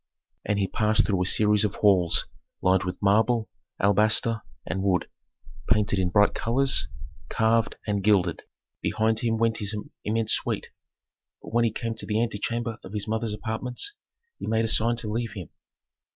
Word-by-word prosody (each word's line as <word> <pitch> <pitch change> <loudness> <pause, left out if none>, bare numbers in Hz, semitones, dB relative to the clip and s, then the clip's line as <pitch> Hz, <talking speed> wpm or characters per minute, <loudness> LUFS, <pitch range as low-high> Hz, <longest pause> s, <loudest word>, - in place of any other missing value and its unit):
And 105 - -1
he 100 -1 +1
passed 110 +1 +2
through 95 -3 0
a 90 - +1
series 105 +1 +3
of 105 -2 -1
halls 95 -5 +3 0.3
lined 95 0 +2
with 90 0 -4
marble, 110 +3 +2 0.3
alabaster, 110 +3 +2 0.2
and 95 - -3
wood, 95 -2 +1 0.6
painted 105 -3 +2
in 90 -1 +1
bright 105 +2 +4
colors, 130 +4 +2 0.4
carved 110 -1 +1
and 100 -2 -1
gilded; 95 -5 +2 0.4
behind 110 0 +1
him 115 -2 0
went 115 0 +1
his 105 0 -1 0.3
immense 110 +1 0
suite. - - -2 0.7
But - - -10
when 120 0 +3
he 115 - +1
came 115 +1 -3
to - - -6
the 105 0 0
antechamber 115 0 -2
of 95 - -10
his 105 0 -2
mother's 110 -1 -1
apartments, 120 - -3 0.5
he - - -6
made 110 0 +1
a - - 0
sign 115 +2 +2
to 115 -2 -3
leave 115 +1 -3
him. 90 -7 -8
110 Hz, 165 wpm, -26 LUFS, 100-115 Hz, 0.7 s, bright